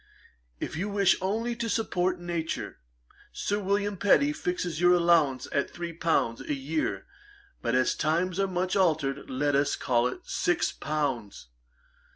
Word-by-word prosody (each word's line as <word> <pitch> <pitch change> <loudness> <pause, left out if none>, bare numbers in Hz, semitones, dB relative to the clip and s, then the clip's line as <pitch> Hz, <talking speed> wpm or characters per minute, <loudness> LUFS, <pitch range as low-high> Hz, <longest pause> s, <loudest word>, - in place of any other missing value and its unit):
If - - -4
you 195 +6 -2
wish 200 -2 +3
only 225 +5 -1
to 230 -1 -2
support 185 -5 0
nature, 170 - -4 0.5
Sir 205 +1 -2
William 200 0 0
Petty 280 +10 +4
fixes 180 - -3
your 175 0 +6
allowance 165 -7 +3
at 140 - 0
three 170 -1 -6
pounds 160 -8 0
a 145 - -2
year 145 +4 -2 0.6
but 120 +1 0
as 130 0 +3
times 170 +4 0
are 195 - +2
much 185 0 -1
altered, 160 -8 +1
let 145 +2 0
us 140 +1 +2
call 120 -1 +1
it 125 - -6
six 175 - 0
pounds. 125 - -3
170 Hz, 150 wpm, -28 LUFS, 145-190 Hz, 0.6 s, your